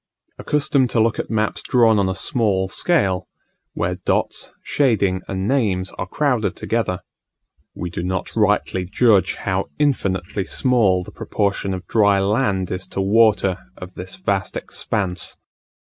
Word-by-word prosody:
Accustomed 140 Hz, -3 st, +1 dB
to 115 Hz, -, +1 dB
look 110 Hz, 0 st, +2 dB
at -, -, -3 dB
maps 110 Hz, -1 st, 0 dB
drawn 115 Hz, -4 st, +4 dB
on 95 Hz, -1 st, +1 dB
a 95 Hz, -, -2 dB
small 100 Hz, -6 st, +1 dB
scale, 95 Hz, -, +1 dB, 0.5 s
where -, -, -2 dB
dots, -, -, -1 dB
shading, 100 Hz, -9 st, +1 dB
and 95 Hz, 0 st, -2 dB
names 100 Hz, -9 st, +1 dB
are 90 Hz, -, -5 dB
crowded 125 Hz, -1 st, 0 dB
together, 110 Hz, -5 st, -1 dB, 0.7 s
we 90 Hz, -1 st, -5 dB
do 85 Hz, -, -4 dB
not 95 Hz, +1 st, -3 dB
rightly 105 Hz, -3 st, +1 dB
judge 100 Hz, 0 st, +3 dB
how 95 Hz, 0 st, -2 dB
infinitely 100 Hz, -10 st, 0 dB
small 105 Hz, -9 st, +2 dB
the -, -, -11 dB
proportion 100 Hz, -1 st, -1 dB
of 95 Hz, -1 st, -5 dB
dry 100 Hz, 0 st, +3 dB
land 100 Hz, -2 st, 0 dB
is 95 Hz, 0 st, -4 dB
to -, -, -5 dB
water 100 Hz, -2 st, +3 dB, 0.2 s
of 90 Hz, 0 st, -9 dB
this 95 Hz, +1 st, -7 dB
vast 95 Hz, -1 st, -1 dB
expanse. 90 Hz, -4 st, -3 dB
100 Hz, 145 wpm, -21 LUFS, 95-115 Hz, 0.7 s, drawn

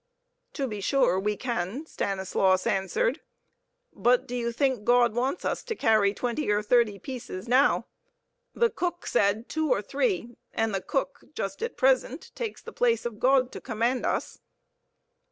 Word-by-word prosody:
"To 275 Hz, -3 st, -2 dB
be 210 Hz, -4 st, -5 dB
sure 260 Hz, -5 st, +2 dB
we 210 Hz, +1 st, -1 dB
can," 240 Hz, -, -3 dB
Stanislaus 190 Hz, -, 0 dB
answered. 195 Hz, -, 0 dB, 0.7 s
"But 245 Hz, 0 st, +2 dB
do 245 Hz, -, -4 dB
you 235 Hz, -1 st, -1 dB
think 255 Hz, -2 st, 0 dB
God 240 Hz, 0 st, +4 dB
wants 260 Hz, +8 st, -1 dB
us -, -, -1 dB
to 455 Hz, -2 st, -3 dB
carry 215 Hz, -, +3 dB
twenty 245 Hz, +6 st, -2 dB
or 210 Hz, 0 st, +2 dB
thirty 220 Hz, -2 st, +3 dB
pieces 245 Hz, -6 st, -7 dB
now? 260 Hz, +4 st, +3 dB, 0.7 s
The 470 Hz, -1 st, +3 dB
cook 350 Hz, -1 st, -3 dB
said 210 Hz, +1 st, +1 dB
two 315 Hz, 0 st, -1 dB
or -, -, +2 dB
three, 365 Hz, -, -1 dB, 0.2 s
and 225 Hz, -1 st, 0 dB
the 195 Hz, -, -1 dB
cook 275 Hz, +4 st, -3 dB
just 195 Hz, -6 st, -4 dB
at 465 Hz, +1 st, -4 dB
present -, -, +1 dB
takes 455 Hz, -3 st, -5 dB
the -, -, -9 dB
place 470 Hz, -, +1 dB
of 225 Hz, -3 st, -4 dB
God 260 Hz, -1 st, +3 dB
to -, -, -8 dB
command 240 Hz, +2 st, -1 dB
us." -, -, -2 dB
240 Hz, 160 wpm, -27 LUFS, 210-280 Hz, 0.7 s, God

